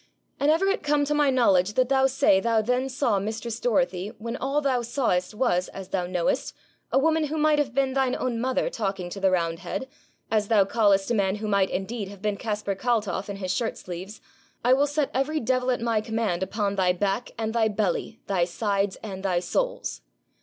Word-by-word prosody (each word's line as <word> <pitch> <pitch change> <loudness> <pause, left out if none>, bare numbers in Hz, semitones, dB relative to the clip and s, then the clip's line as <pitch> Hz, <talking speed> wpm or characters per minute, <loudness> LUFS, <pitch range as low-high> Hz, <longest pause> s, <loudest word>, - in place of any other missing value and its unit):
'An' 285 - +2
ever 325 +5 +3
it 390 +1 +1
come 295 0 +2
to 295 - 0
my 295 -1 +3
knowledge 210 -7 +3
that 255 +2 +2
thou 265 -1 +4
say 265 -7 +3
thou 230 +2 +2
then 250 +4 0
saw 250 -6 +1
mistress 220 +3 -4
Dorothy, 230 -7 +1
when 230 +2 -5
all 275 +2 0
thou 265 -4 +1
sawest 225 -6 -1
was, 185 -7 +1
as 190 -1 -9
thou 180 -2 -1
knowest, 180 -2 -1 0.4
a - - +3
woman 320 +2 +3
who 305 +2 -3
might 305 -1 +3
have 270 -4 -1
been 270 -1 +1
thine 265 -2 +1
own 235 -3 -2
mother 260 +2 0
talking 195 -5 -3
to 195 - -6
the 190 0 +3
roundhead, 170 +7 -2 0.4
as 215 -2 +2
thou 205 -3 +4
callest 200 -1 +2
a - - +3
man 195 -3 +1
who 215 +1 -5
might 200 -2 +2
indeed 200 +2 -3
have 200 0 -11
been 210 +1 -1
Caspar 210 -1 -2
Kaltoff 205 -3 -1
in 200 - -4
his 190 -2 -2
shirt 230 -3 -2
sleeves, 185 +4 -8 0.4
I 250 - +6
will 280 +2 +3
set 290 -1 -1
every 280 +4 0
devil 255 +1 0
at 250 -2 0
my 230 -2 +1
command 220 -5 -1
upon 200 +1 -1
thy 180 -1 +3
back 195 +5 -1
and 220 -1 -2
thy 230 -2 +3
belly, 210 +1 -2
thy 185 -3 +1
sides 200 +1 -1
and 195 -3 -6
thy 185 -3 +1
soles. - - -2
220 Hz, 210 wpm, -26 LUFS, 195-260 Hz, 0.4 s, I